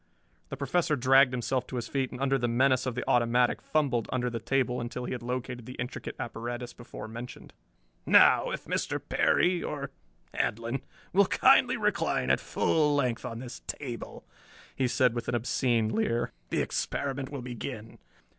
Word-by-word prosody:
The - - -5
Professor 170 -4 +1
dragged 135 0 +5
himself 125 +1 -1
to - - -7
his 120 -2 -3
feet 135 -2 -1
and 125 - -8
under 135 0 +1
the 120 - 0
menace 130 +2 +2
of 125 - -2
the 125 - -4
automatic 120 +1 +3
fumbled 135 -7 0
under 125 -1 -1
the 115 - -3
table 125 +1 0
until 125 +1 -5
he - - -5
had 125 - -4
located 125 -1 -4
the 125 - -7
intricate 125 +1 -5
apparatus 120 +1 -5
before 120 -2 -9
mentioned. 115 +3 -9 0.5
"Now - - +6
if - - -5
Mr. - - -1
Perry 180 -1 +2
or 140 -2 -4 0.4
Handlon 115 +4 -1 0.3
will 200 +1 +5
kindly - - +5
recline 65 - +1
at 65 - +3
full 150 -2 +1
length 125 -5 0
on 115 - -5
this 125 +1 -8
table," 120 -6 -6 0.5
he 130 - +1
said 125 0 +3
with 120 -1 -4
an 120 - 0
obscene 120 -1 +1
leer, 115 +2 0 0.2
"the - - +1
experiment 135 -1 -2
will 140 -4 -6
begin." 120 -2 -7
125 Hz, 170 wpm, -29 LUFS, 120-135 Hz, 0.5 s, Now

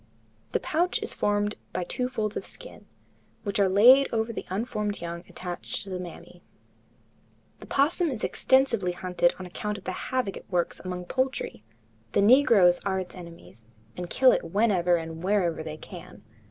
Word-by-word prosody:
The - - +2
pouch 345 +4 0
is - - -2
formed 205 0 0 0.2
by 185 - -1
two 250 +8 -2
folds 220 -4 -2
of - - -3
skin, - - -12 0.6
which 200 -2 -2
are 195 -1 +4
laid 250 +8 +7
over 225 0 -1
the - - -6
unformed 210 +1 -2
young 170 0 -6
attached 180 -1 -5
to 195 - -9
the 185 - -3
mammae. 180 -1 -10 1.2
The - - -12
opossum 320 +5 +2
is 245 -6 -5
extensively 235 -9 +2
hunted 180 -1 +1
on 185 - -7
account 210 +3 -4
of 195 - -12
the 185 - -3
havoc 250 -1 -2
it - - -12
works 175 -3 -1
among 180 -1 -5
poultry. 260 - -2 0.5
The - - +3
negroes 215 -7 +6
are 190 -1 -1
its 185 -1 -6
enemies, 170 - -12 0.3
and 180 -1 -6
kill 260 +5 +5
it - - +1
whenever 185 -3 +2
and 165 -1 -5
wherever 185 -5 +1
they 155 -1 -6
can. 180 - -11
195 Hz, 170 wpm, -27 LUFS, 180-230 Hz, 1.2 s, laid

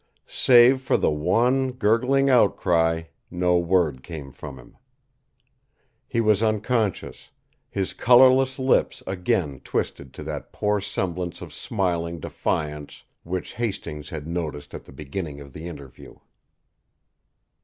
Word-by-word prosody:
Save 125 +1 +5
for 130 - +1
the - - +1
one, 120 - +1
gurgling 125 +4 +2
outcry, 85 -9 +3 0.3
no 90 0 +2
word 85 -6 +1
came 75 -4 -8
from - - -9
him. - - -16 1.3
He 115 - -1
was 110 -2 +3
unconscious, 110 -1 -1 0.4
his 95 -2 -2
colourless 130 +1 +5
lips 130 -1 +1
again 90 -6 -1
twisted 70 -2 -3
to - - -7
that - - -6
poor 105 -1 0
semblance 90 -3 -3
of 85 -4 -9
smiling 85 -3 -2
defiance 75 -1 -3 0.2
which 90 +2 -5
Hastings 85 -10 -4
had 75 -2 -6
noticed 80 -4 -4
at - - -8
the - - -14
beginning 75 +2 -6
of 70 -2 -12
the 80 +3 -7
interview. 70 -6 -11
90 Hz, 125 wpm, -24 LUFS, 80-115 Hz, 1.3 s, Save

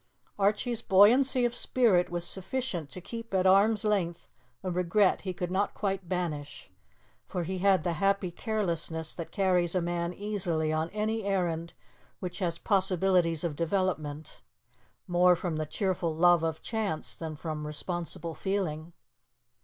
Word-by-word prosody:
Archie's 215 +4 +1
buoyancy 245 +6 +5
of 240 - 0
spirit 225 -8 +3
was 175 0 -2
sufficient 190 - -2
to 185 - -7
keep 230 +3 -6
at 185 0 +2
arm's 205 +4 +4
length 180 -5 -1 0.3
a 185 - -2
regret 180 +3 +2
he 190 - -3
could 180 0 -4
not 200 +2 0
quite 195 -3 -2
banish; 155 -6 -4 0.6
for 180 - -3
he 185 +2 -3
had 190 -3 +3
the 175 -1 0
happy 195 +1 +1
carelessness 170 -6 -2
that 170 - -6
carries 185 -3 +2
a - - +3
man 170 0 -2
easily 180 -6 -1
on 160 +1 -1
any 215 +2 -2
errand 175 -4 -1 0.5
which 180 0 -5
has 170 -3 -1
possibilities 185 -5 +2
of 165 -4 -2
development, 160 -3 -2 0.7
more 180 0 +5
from 170 -2 -3
the 155 -1 -2
cheerful 170 -1 -1
love 175 0 +5
of 160 -1 -2
chance 215 -8 -2
than 160 -2 -6
from 150 -1 -5
responsible 170 +2 -4
feeling. 170 -4 -3
180 Hz, 145 wpm, -29 LUFS, 165-200 Hz, 0.7 s, buoyancy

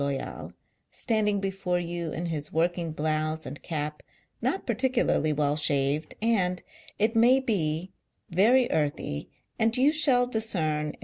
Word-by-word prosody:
Loyal, 140 -1 -4 0.4
standing 210 -3 0
before 195 -2 -1
you 170 -2 -3
in 170 +3 -4
his 150 -3 -4
working, 170 +1 0
blouse 155 +1 -1
and 145 - -7
cap, 150 -2 -4 0.4
not 385 - -1
particularly 240 - +1
well 145 -1 +1
shaved, 145 +1 0
and, 185 -6 +1 0.3
it 220 +2 +1
may 245 +4 +5
be, 180 -8 -1 0.4
very 235 +8 +4
earthy, 145 - -2 0.3
and 225 +1 +2
you 270 +4 +5
shall' 280 -6 +4
discern 175 -11 0
in 150 - -6
M. - - -29
175 Hz, 140 wpm, -27 LUFS, 155-225 Hz, 0.4 s, may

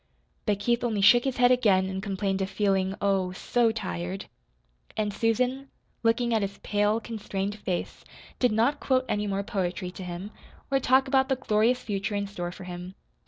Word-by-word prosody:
But 205 -1 +2
Keith 235 +4 0
only 220 -4 0
shook 240 +5 +6
his 265 -2 -1
head 245 0 +5
again 200 -7 +4
and 190 0 -4
complained 195 -1 -1
of 190 - -1
feeling, 195 -2 +1
oh, 195 -2 +1
so 235 +4 +1
tired. 90 - -4 0.7
And 210 -1 0
Susan, 250 +5 0 0.3
looking 235 +1 +2
at 220 - +2
his 200 0 -3
pale, 210 +1 +1
constrained 205 -3 -4
face, 180 -3 -3 0.4
did 250 -2 +3
not 235 +7 +2
quote 260 -1 +1
any 210 0 -1
more 200 0 -1
poetry 185 -3 -2
to 190 - -8
him, 180 +3 -6 0.4
or 270 - +3
talk 265 +1 +3
about 265 0 +3
the 265 - +3
glorious 240 0 +1
future 205 0 -2
in 200 0 -1
store 175 -3 -5
for 190 - -10
him. 180 +1 -7
205 Hz, 180 wpm, -27 LUFS, 190-240 Hz, 0.7 s, shook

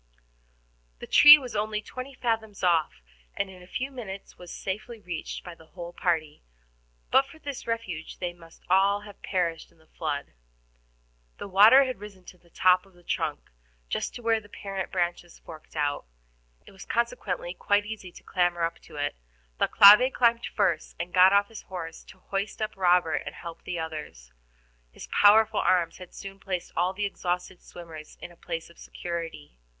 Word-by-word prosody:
The - - -8
tree 295 0 +10
was 255 -6 -8
only 210 0 -1
twenty 255 +5 -8
fathoms 220 -5 -2
off, 160 - +1 0.3
and 195 -1 -2
in 185 -1 -14
a 180 - -14
few 260 +8 -4
minutes 205 -7 -8
was 180 -1 -11
safely 215 +4 -5
reached 175 -5 -6
by 175 - -8
the 160 -1 -18
whole 175 0 -9
party; 160 -5 -1 0.7
but 270 - +5
for 320 - -15
this 285 -6 -7
refuge 190 -9 -4
they 175 -1 -4
must 165 -1 -18
all 195 +2 +3
have 205 -1 -13
perished 170 -4 -2
in - - -27
the 160 - -25
flood. 150 - -4 1.0
The - - -7
water 215 +8 +7
had 255 -5 -4
risen 200 -3 -12
to - - -24
the 170 - -25
top 185 +2 +3
of 195 - -23
the 175 - -21
trunk, 160 -3 -3 0.4
just - - -3
to 240 - -8
where 225 -1 +2
the 205 - -18
parent 195 -2 -5
branches 175 -1 -2
fork 160 -2 -12
out. 145 - -1 0.6
It - - -14
was 195 - -12
consequently, - - -2
quite 205 0 +1
easy 210 -4 -7
to - - -15
clamber 175 -2 0
up 165 0 -2
to - - -16
it. 145 0 -2 0.5
Thalcave 210 +6 +8
climbed 235 -1 +3
up - - -14
first, 170 -4 0
and 175 +1 -5
got 185 +1 +7
off 200 0 +4
his 225 - -9
horse 165 -3 -8
to - - -15
hoist 195 +1 -4
up 215 0 -3
Robert 180 -3 +3
and - - -6
help 170 -1 -10
the 175 - -3
others. 150 - -7 0.6
His - - -11
powerful 215 +1 +5
arms 170 -2 +1
had 180 -1 -12
soon 195 0 -9
placed 185 -2 -4
all 180 +2 +1
the 205 +2 -3
exhausted 180 -2 -3
swimmers 160 -3 -11
in 175 - -9
a - - -17
place 165 -1 -6
of - - -21
security. 165 - -7
185 Hz, 185 wpm, -27 LUFS, 170-210 Hz, 1.0 s, tree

